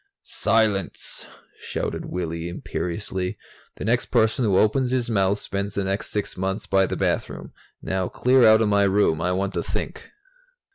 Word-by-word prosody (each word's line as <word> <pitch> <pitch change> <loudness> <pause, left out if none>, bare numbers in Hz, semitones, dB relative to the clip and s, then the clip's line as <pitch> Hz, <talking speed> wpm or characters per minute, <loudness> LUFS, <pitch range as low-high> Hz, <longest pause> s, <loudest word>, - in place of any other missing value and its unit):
"Silence!" 105 -4 -1 0.3
shouted - - -4
Willy 85 -1 -4
imperiously. 90 +1 -4 0.4
"The - - -6
next 120 +3 +1
person 115 +1 +2
who 100 -4 +3
opens 125 +6 +3
his 125 -2 0
mouth 100 -1 +2
spends 100 0 -3
the 100 - 0
next 95 +2 -2
sixth 105 -3 -3
months 95 +1 -2
by 95 -1 +3
the - - -3
bathroom. - - -2 0.3
Now 95 -1 -1
clear 130 0 +3
out 110 0 +7
of 110 - +3
my 100 -1 +4
room. 95 -5 +2
I 90 +2 +1
want 95 +2 -1
to - - -1
think." - - -5
100 Hz, 160 wpm, -24 LUFS, 95-110 Hz, 0.4 s, out